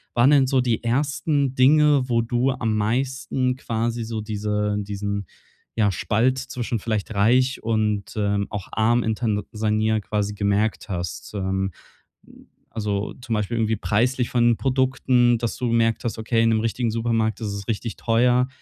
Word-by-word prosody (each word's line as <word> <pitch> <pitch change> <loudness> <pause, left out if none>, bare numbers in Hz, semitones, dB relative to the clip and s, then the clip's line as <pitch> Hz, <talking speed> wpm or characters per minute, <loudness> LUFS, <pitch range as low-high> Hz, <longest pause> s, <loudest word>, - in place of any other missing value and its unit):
waren 120 +4 +5
denn 140 -3 +5
so 130 -1 +2
die 120 -2 -1
ersten 140 +2 0
Dinge, 145 0 +4
wo 115 -1 +2
du 120 +3 0
am 110 -4 -1
meisten 125 +3 -1
quasi 115 -2 -2
so 110 -1 -4
diese 105 -1 -2
diesen, 100 -1 -4 0.5
ja, 105 -3 +2
Spalt 120 +7 +1
zwischen 125 -3 -4
vielleicht 110 0 -3
reich 125 +6 +2
und, 110 -2 -1
ähm, 100 -1 0
auch 100 -3 -5
arm 115 +2 +2
in 110 - 0
Tansania 110 0 0
quasi 105 0 -2
gemerkt 105 +2 0
hast? 90 -1 -5
Ähm, 95 0 -1 1.0
also 105 -2 -3
zum 120 -2 -4
Beispiel 105 +2 -1
irgendwie 110 -1 +1
preislich 120 +4 0
von 120 -1 +3
Produkten, 130 -2 +2
dass 115 -1 -3
du 125 - -1
gemerkt 115 -1 +1
hast: 115 -1 -3
„Okay, 115 +1 +1
in 115 - +4
'nem 110 - +2
richtigen 115 +1 -1
Supermarkt 115 -2 0
ist 110 - -2
es 100 -1 -5
richtig 115 0 -3
teuer“, 125 +2 +2
115 Hz, 160 wpm, -23 LUFS, 105-125 Hz, 1.0 s, waren